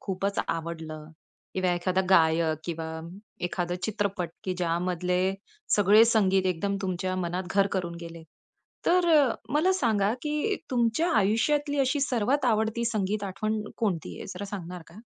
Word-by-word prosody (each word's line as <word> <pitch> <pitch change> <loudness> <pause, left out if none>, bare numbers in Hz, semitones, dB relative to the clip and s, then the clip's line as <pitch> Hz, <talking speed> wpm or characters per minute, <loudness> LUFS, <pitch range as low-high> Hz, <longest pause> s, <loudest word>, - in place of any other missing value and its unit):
खूपचं 195 +1 -2
आवडलं 160 -2 -4 0.5
किंवा 185 -1 +1
एखादा 185 +2 0
गायक 160 -3 +4
किंवा 165 -1 -4 0.6
एखादा 175 0 -2
चित्रपट, 200 -3 -1 0.2
की 185 - -1
ज्यामधले 180 +1 0 0.6
सगळे 205 +2 +7
संगीत 195 -5 +3
एकदम 190 +3 0
तुमच्या 185 0 -2
मनात 180 0 -2
घर 200 -1 +4
करून 180 -3 -2
गेले. 165 -1 -9 0.6
तर 355 0 +4 0.5
मला 340 +6 +4
सांगा, 220 - +2
की 300 +7 0
तुमच्या 245 +7 +1
आयुष्यातली 285 +8 +1
अशी 270 +2 +1
सर्वात 265 +1 +1
आवडती 220 0 +1
संगीत 210 -2 -1
आठवण 215 +3 -2
कोणती 195 -8 -2
आहे? - - -7
जरा 190 +3 -5
सांगणार 180 -3 -6
का? 175 +6 -13
195 Hz, 135 wpm, -27 LUFS, 175-225 Hz, 0.6 s, सगळे